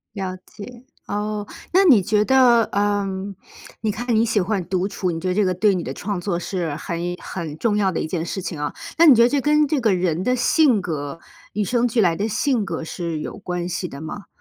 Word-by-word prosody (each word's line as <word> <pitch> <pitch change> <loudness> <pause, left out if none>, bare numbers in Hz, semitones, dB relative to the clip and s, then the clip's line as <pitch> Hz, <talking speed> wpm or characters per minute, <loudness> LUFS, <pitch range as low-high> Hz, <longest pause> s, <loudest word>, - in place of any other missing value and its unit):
了 190 -2 -3
解， 240 +3 -11 0.2
哦。 210 0 -3 0.3
那 380 +2 +6
你 255 - +7
觉 210 +3 +2
得， 250 -3 +5
呃， 205 0 +1 0.8
你 220 - 0
看 240 +3 -2
你 220 +1 +3
喜 225 -2 +1
欢 195 0 -1
独 185 0 0
处， 190 -2 -2
你 165 - -4
觉 180 - -4
得 - - +1
这 210 - +3
个 185 - +1
对 200 +2 +2
你 175 - -2
的 130 - -5
创 200 +5 -4
作 175 -1 -2
是 175 -4 -3
很 170 +2 -4 0.2
很 160 -5 -6
重 210 +3 +1
要 195 -2 +2
的 170 - -2
一 - - -2
件 165 0 -3
事 190 - -4
情 165 -4 -5
啊， 150 - -3 0.2
那 335 - +6
你 290 -6 +9
觉 230 - +5
得 240 - +4
这 285 - +1
跟 300 +1 +3
这 295 0 0
个 220 -4 +3
人 180 -1 0
的 250 +4 +2
性 250 - +3
格 150 -3 -4 0.3
与 210 - 0
生 240 +4 +1
俱 230 -1 +1
来 175 -4 +3
的 205 +5 -1
性 240 +1 0
格 165 -3 -4
是 165 -1 -4
有 - - -6
关 180 -2 -4
系 180 +1 -3
的 140 -3 -9
吗？ 160 +6 -7
200 Hz, 255 characters per minute, -22 LUFS, 175-230 Hz, 0.8 s, 你